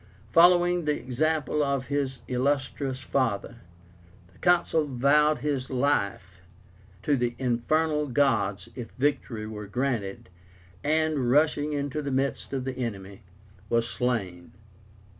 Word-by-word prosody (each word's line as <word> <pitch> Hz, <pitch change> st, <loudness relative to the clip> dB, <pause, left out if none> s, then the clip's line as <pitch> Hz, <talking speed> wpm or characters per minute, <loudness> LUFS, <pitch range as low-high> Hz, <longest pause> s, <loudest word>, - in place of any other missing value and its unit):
Following 175 Hz, +1 st, +5 dB
the 150 Hz, -1 st, +1 dB
example 150 Hz, +4 st, 0 dB
of 140 Hz, -2 st, -1 dB
his 140 Hz, -2 st, -2 dB
illustrious 135 Hz, +1 st, -1 dB
father, 120 Hz, -3 st, -1 dB, 0.8 s
the -, -, -23 dB
Consul 170 Hz, -3 st, +2 dB
vowed 145 Hz, +4 st, +3 dB
his 140 Hz, -3 st, -2 dB
life 100 Hz, -8 st, -1 dB, 0.6 s
to 145 Hz, -, +2 dB
the 120 Hz, -2 st, -1 dB
Infernal 150 Hz, +5 st, 0 dB
Gods 105 Hz, -8 st, +1 dB
if 120 Hz, -3 st, -7 dB
victory 125 Hz, -5 st, -1 dB
were 105 Hz, -1 st, -7 dB
granted, 110 Hz, -5 st, -2 dB, 0.5 s
and, 155 Hz, -4 st, +1 dB
rushing 150 Hz, +2 st, +2 dB
into 145 Hz, +1 st, -2 dB
the 140 Hz, -, -4 dB
midst 135 Hz, -1 st, -1 dB
of 135 Hz, -2 st, -3 dB
the 130 Hz, -1 st, -4 dB
enemy, 100 Hz, -5 st, -5 dB, 0.5 s
was 115 Hz, 0 st, +2 dB
slain. 100 Hz, -9 st, -3 dB
135 Hz, 120 wpm, -27 LUFS, 120-150 Hz, 0.8 s, Following